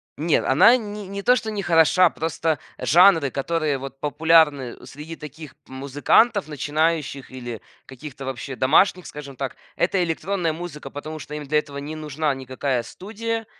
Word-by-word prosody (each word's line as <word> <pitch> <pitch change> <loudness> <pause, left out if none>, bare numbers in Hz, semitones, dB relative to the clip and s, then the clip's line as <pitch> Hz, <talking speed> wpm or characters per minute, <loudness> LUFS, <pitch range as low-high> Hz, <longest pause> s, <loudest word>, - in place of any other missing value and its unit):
Нет, 160 +2 +1
она 190 - +6
ни 210 -3 -7
не 200 +1 -5
то 250 +5 +4
что 220 -3 -3
не 210 -2 -3
хороша, 170 +1 +4
просто 160 0 -2 0.2
жанры, 170 -3 +5
которые 150 +2 -1
вот 135 0 -9
популярны 150 -4 +2
среди 150 +3 -9
таких 150 -1 -11
п - - -23
музыкантов 145 - +2
начинающих 150 -1 -1
или 120 -3 -7 0.2
каких-то 135 +1 -10
вообще 135 +1 -5
домашних, 170 +8 +3
скажем 140 -2 -9
так, 135 0 -4 0.2
это 185 -2 +1
электронная 170 0 -1
музыка. 160 -4 -8
Потому 155 +3 -7
что 150 0 -8
им 150 -1 -6
для 150 +2 +2
этого 145 -2 -8
не 145 +3 -6
нужна 155 -1 -2
никакая 130 -1 -2
студия, 225 - -5
155 Hz, 160 wpm, -23 LUFS, 140-175 Hz, 0.2 s, она